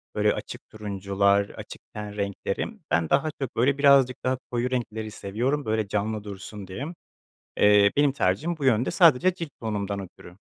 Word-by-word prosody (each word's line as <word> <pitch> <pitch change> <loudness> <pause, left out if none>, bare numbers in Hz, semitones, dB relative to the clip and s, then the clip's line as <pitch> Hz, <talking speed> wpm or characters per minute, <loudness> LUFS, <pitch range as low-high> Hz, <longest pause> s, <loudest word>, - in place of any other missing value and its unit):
Böyle - - +3
açık - - -8
turuncular, 100 -1 0
açık - - -10
ten 105 -1 -7
renkleri. 100 -1 -2 0.2
Ben 85 -1 +2
daha 140 +3 +2
çok 135 - -4
böyle 135 +4 +2
birazcık 140 -3 +4
daha 130 0 +1
koyu 120 +1 -1
renkleri 110 -3 -3
seviyorum, 125 +10 -2
böyle 110 -1 0
canlı 105 +1 -2
dursun 100 0 -8
diye. 95 +9 -5 0.7
Eee, 105 0 +6
benim 145 -1 +4
tercihim 115 - 0
bu 145 - -3
yönde, 120 -1 +3
sadece 170 +1 +5
cilt 170 -3 -6
tonumdan 100 -3 -3
ötürü. 90 -1 -11
110 Hz, 160 wpm, -26 LUFS, 100-130 Hz, 0.7 s, Eee